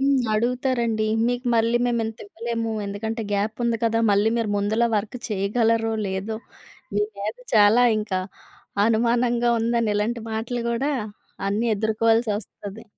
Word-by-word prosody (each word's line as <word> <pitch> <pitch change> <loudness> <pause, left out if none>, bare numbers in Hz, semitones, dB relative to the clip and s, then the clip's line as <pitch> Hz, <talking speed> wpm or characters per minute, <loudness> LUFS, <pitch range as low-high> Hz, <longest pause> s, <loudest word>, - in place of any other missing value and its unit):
హ్మ్. 275 -1 +3
అడుగుతారండి 235 -1 0 0.2
"మీకు 245 +1 -2
మళ్ళీ 230 +1 +3
మేము 235 -1 +1
ఇంత 220 0 -5
ఇవ్వలేము. 230 +1 -3
ఎందుకంటే 220 +3 -3
గ్యాప్ 205 +2 0
ఉంది 235 -1 +1
కదా! 225 0 +2
మళ్ళీ 205 +2 +3
మీరు 225 -3 0
ముందుల 215 +4 +1
వర్క్ 210 +4 -3
చేయగలరో? 225 +2 +1
లేదో? 195 +3 -3 0.6
మీ 205 - +2 0.2
మీద 210 +3 -3 0.2
చాలా 215 +3 +6 0.2
ఇంకా 195 -3 -2 0.7
అనుమానంగా 235 +1 +2
ఉందని", 230 -1 +1
ఇలాంటి 225 +2 -1
మాటలు 230 +2 -2
కూడా 270 +6 0 0.6
అన్నీ 215 +4 0
ఎదుర్కోవాల్సొస్తది. 220 -1 -1
225 Hz, 130 wpm, -24 LUFS, 210-235 Hz, 0.7 s, చాలా